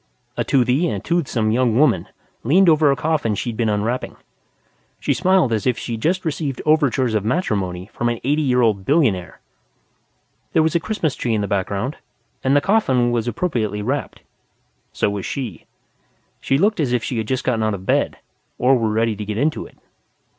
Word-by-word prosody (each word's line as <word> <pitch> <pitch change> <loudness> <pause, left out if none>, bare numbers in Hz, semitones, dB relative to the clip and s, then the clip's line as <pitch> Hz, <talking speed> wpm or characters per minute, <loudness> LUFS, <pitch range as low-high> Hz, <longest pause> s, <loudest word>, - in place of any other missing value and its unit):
A - - 0
toothy 130 +5 +2
and 105 -1 -4
toothsome 130 -10 0
young 120 -1 +2
woman 150 +3 +3 0.4
leaned 175 +9 +4
over 155 -2 +4
a 140 - +3
coffin 145 -6 0
she'd 115 +2 -3
been 115 -1 0
unwrapping. 110 +4 -2 0.8
She - - 0
smiled 185 -8 +2
as 110 +2 -1
if 125 - +1
she'd 115 -2 -5
just 185 +6 0
received 145 -4 -2
overtures 140 -6 +2
of 105 -2 0
matrimony 100 - -1
from 120 - -1
an 120 -1 -2
eighty 145 +4 +1
year 125 -4 +2
old 105 -4 +1
billionaire. 115 - +1 1.1
There 160 - +4
was 160 - +1
a 170 - +3
Christmas 165 -6 -2
tree 115 -2 -1
in 105 - 0
the 100 - -2
background, 100 +7 -2 0.5
and 135 +1 +2
the 145 - +4
coffin 130 - +2
was 120 -1 -1
appropriately 110 - -2
wrapped. 140 +6 -3 0.7
So - - 0
was 100 -2 -4
she. 120 - -5 0.7
She 135 - +1
looked 205 +5 +2
as 135 -6 0
if 120 -2 0
she 120 - -2
had 110 - -3
just 130 +1 -1
gotten 120 -3 0
out 110 -1 0
of 95 -1 -10
bed, - - +1 0.4
or 130 +2 +4
were 115 -3 0
ready 110 +1 +1
to 105 - -5
get 105 0 -4
into 150 +5 -1
it. - - -22
125 Hz, 190 wpm, -20 LUFS, 110-150 Hz, 1.1 s, leaned